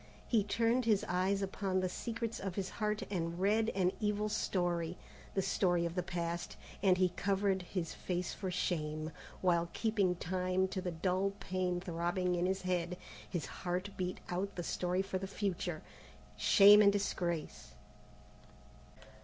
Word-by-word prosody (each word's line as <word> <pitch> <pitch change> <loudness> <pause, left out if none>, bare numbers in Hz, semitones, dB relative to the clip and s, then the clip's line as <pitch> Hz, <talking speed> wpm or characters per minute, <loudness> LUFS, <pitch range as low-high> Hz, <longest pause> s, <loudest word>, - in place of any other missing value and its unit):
He 220 -3 +3
turned 230 +4 +1
his 215 -3 +3
eyes 190 +3 +1
upon 190 -1 -1
the 185 - +1
secrets 230 +4 -4
of 190 -2 -4
his 190 -2 -2
heart, 210 -1 -1
and 170 -2 -2
read 215 +4 +3
an 185 -2 +3
evil 210 0 0
story, 175 -4 -1 0.4
the 195 - +2
story 175 -2 +2
of 170 - -2
the 180 - 0
past, 170 0 -3 0.2
and 185 -2 +4
he 185 0 +4
covered 195 +1 0
his 180 -2 -4
face 180 -1 -3
for 190 - -4
shame, 155 -3 -1 0.3
while, 170 -2 +2
keeping 205 -5 +1
time 185 +2 0
to 185 - -3
the 180 - -2
dull 185 +3 0
pain 185 -2 -1
throbbing 175 0 -1
in 175 +1 +1
his 190 0 -1
head, 180 -1 -1 0.3
his 175 - -2
heart 180 +3 -3
beat 185 0 -3
out 190 +3 -2
the 175 - -3
story 180 +2 0
for 195 -1 -3
the 195 - -4
future. 185 -5 -2 0.5
Shame 195 - +8
and 200 -1 +7
disgrace. 170 - -2
185 Hz, 155 wpm, -34 LUFS, 175-200 Hz, 0.5 s, Shame